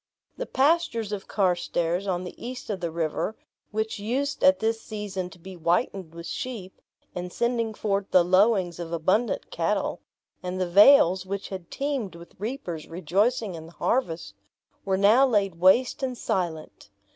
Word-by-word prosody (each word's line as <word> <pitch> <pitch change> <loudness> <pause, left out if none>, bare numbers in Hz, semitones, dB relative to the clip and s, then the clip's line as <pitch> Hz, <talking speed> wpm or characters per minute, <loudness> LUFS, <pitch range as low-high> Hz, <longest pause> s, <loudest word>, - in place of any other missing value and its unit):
The - - -5
pastures 265 -7 +1
of 200 -2 -5
Carstairs 175 -1 0
on 180 -1 -1
the 180 - -7
east 250 -1 -5
of 195 - -3
the 170 -1 -2
river, 165 +6 -2 0.3
which 220 0 -2
used 265 +7 -2
at 280 0 +6
this 225 -1 -1
season 205 -5 -5
to 185 - -15
be 185 +2 -10
whitened 175 0 -1
with 170 0 -8
sheep, 210 -6 -6 0.3
and 180 0 -5
sending 235 -1 -1
forth 200 -2 -1
the 180 - +5
lowings 185 -2 +3
of 170 -1 -5
abundant 185 +8 0
cattle; - - -1 0.4
and 180 0 -4
the 185 - 0
vales, 190 -1 +6
which 200 +1 -4
had 185 -3 -7
teemed 270 - -3
with 170 0 -13
reapers 200 - -5
rejoicing 195 +6 0
in 160 -1 -8
the 170 - -15
harvest, 165 - -1 0.5
were 190 -1 +1
now 220 +8 +6
laid 200 -7 +1
waste 240 - +4
and 255 -2 -2
silent. 165 - -3
195 Hz, 160 wpm, -26 LUFS, 175-230 Hz, 0.5 s, at